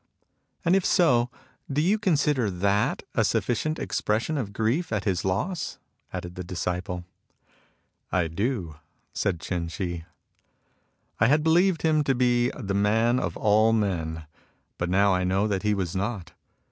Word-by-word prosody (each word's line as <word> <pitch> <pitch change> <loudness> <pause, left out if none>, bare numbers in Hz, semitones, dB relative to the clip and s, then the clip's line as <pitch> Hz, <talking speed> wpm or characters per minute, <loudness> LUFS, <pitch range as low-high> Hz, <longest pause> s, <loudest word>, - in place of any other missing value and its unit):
And 170 +3 +4
if 195 - +2
so, 125 -12 +3 0.4
do 140 - 0
you 190 +8 +2
consider 150 - +2
that 100 +3 0
a - - +2
sufficient 155 +6 0
expression 115 +9 -1
of 120 -8 -3
grief 115 - 0
at 105 -3 -1
his 95 -4 0
loss? 130 - -2 0.2
" - - -44
added 90 0 -5
the 90 - -6
disciple. 90 0 -3 1.1
"I 90 -2 +1
do," 90 - -2 0.4
said 90 -5 -1
Ch'in 85 0 -3
Shih. 85 -1 -4 1.1
"I 115 - +5
had 150 +4 +3
believed 170 +2 +3
him 155 -2 +3
to 135 - +2
be 120 0 +2
the 100 -5 -3
man 110 +5 +2
of - - -3
all 110 +1 +4
men, 80 -7 -1 0.5
but 85 - -1
now 100 +1 +4
I 90 0 +1
know 95 +3 +1
that 100 -3 -1
he 105 -1 +1
was 95 -2 -3
not. 95 -3 -3
105 Hz, 155 wpm, -26 LUFS, 90-130 Hz, 1.1 s, I